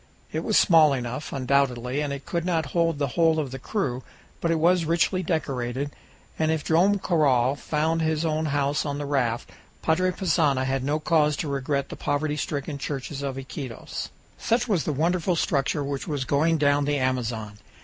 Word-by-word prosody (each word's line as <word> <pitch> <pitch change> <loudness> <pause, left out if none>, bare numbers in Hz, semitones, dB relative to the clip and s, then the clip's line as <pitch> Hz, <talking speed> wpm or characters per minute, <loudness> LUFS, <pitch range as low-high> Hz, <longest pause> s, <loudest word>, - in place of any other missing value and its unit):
It - - -2
was - - +2
small 160 -5 +6
enough, 125 +2 -4
undoubtedly, 130 -1 0
and 145 -1 -2
it 140 -1 -6
could 170 -1 -2
not 165 -5 -1
hold 165 -2 +2
the 140 -2 -1
whole 165 +2 +3
of 145 -5 -2
the 135 - -6
crew, 130 - -2 0.4
but 170 - -1
it 165 - +2
was 175 +2 +3
richly 170 +3 +1
decorated, 140 -5 -2 0.5
and 155 0 +2
if 160 -1 0
Joam 175 +5 +4
Garral 140 -8 +2
found 160 +3 0
his 160 0 0
own 155 0 0
house 145 0 0
on 145 -1 -3
the 145 - -4
raft, 125 -5 -1 0.3
Padre 180 +3 +2
Passanha 160 -7 +1
had 135 0 -1
no 145 +3 +1
cause 150 -2 +2
to 155 - -3
regret 140 0 -1
the - - -6
poverty 145 +1 -1
stricken 145 0 -3
church 140 -1 -4
of 140 -2 -4
Iquitos. 135 -2 -6 0.3
Such 240 +2 +1
was 195 -8 +1
the - - 0
wonderful 170 +5 +1
structure 145 -2 0
which 140 +2 -4
was 145 -5 -2
going 155 +5 +2
down 145 -1 +2
the 145 0 +1
Amazon. 115 -5 -2
145 Hz, 185 wpm, -25 LUFS, 135-160 Hz, 0.5 s, small